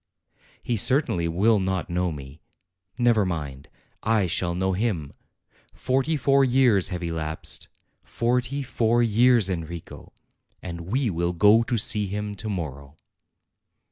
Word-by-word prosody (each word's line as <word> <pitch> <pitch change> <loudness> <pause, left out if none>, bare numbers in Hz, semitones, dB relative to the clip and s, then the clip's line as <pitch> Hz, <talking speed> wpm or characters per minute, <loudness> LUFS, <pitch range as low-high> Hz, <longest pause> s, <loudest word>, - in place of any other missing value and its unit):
He 120 - -1
certainly 105 - +2
will 100 +6 +2
not 95 -2 -2
know 90 0 -1
me. 70 0 -10 0.6
Never 120 -4 +3
mind; 75 -7 -5 0.3
I 110 -3 +1
shall 90 0 -1
know 95 +1 0
him. 90 -8 -2 0.6
Forty 135 +5 0
four 140 0 +3
years 125 -7 +3
have 90 -2 -5
elapsed, 80 -2 -3 0.3
forty 125 +4 -1
four 120 -2 +1
years, 115 -1 +4
En 90 -4 -2
rico! 85 +1 -10 0.5
and 85 -1 -8
we 130 -2 0
will 85 +1 -1
go 105 +6 +5
to 115 +1 -1
see 105 -2 +2
him 105 +1 -4
to 110 +3 -5
morrow." 70 -6 -6
100 Hz, 135 wpm, -24 LUFS, 85-120 Hz, 0.6 s, go